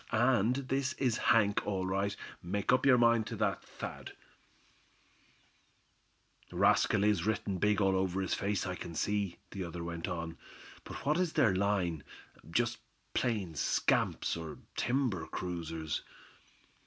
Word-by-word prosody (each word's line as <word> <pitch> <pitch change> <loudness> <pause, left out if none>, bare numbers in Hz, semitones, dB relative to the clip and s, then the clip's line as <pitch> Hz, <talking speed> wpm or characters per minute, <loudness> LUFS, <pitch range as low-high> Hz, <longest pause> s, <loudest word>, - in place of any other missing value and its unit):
And 120 0 +3
this 135 0 -1
is 125 -5 0
Hank, 105 -4 +3
all 95 -2 -1
right, 100 +2 0 0.3
make 100 +6 0
up 130 - +3
your 130 -2 +7
mind 115 -2 +4
to - - -4
that, - - 0
Thad." - - -8 2.4
"Rascal 100 - +3
is 105 0 +2
written 100 -3 -1
big 105 +1 +3
all 95 -1 +3
over 95 0 0
his 95 -2 -1
face, 100 -1 -1
I 95 - -2
can 85 -2 -7
see," 100 -2 -1
the 95 - -4
other 85 0 -5
went 85 -1 -4
on. 85 -1 -4 0.5
"But - - -8
what 150 +4 +2
is 180 -3 0
their 110 -6 +4
line 95 -6 0 0.5
just 120 +6 0 0.3
plain 105 -9 0
scamps, 70 - +1
or 80 -2 -6 0.2
timber 120 -10 0
cruisers?" 80 -3 -3
100 Hz, 140 wpm, -32 LUFS, 90-115 Hz, 2.4 s, your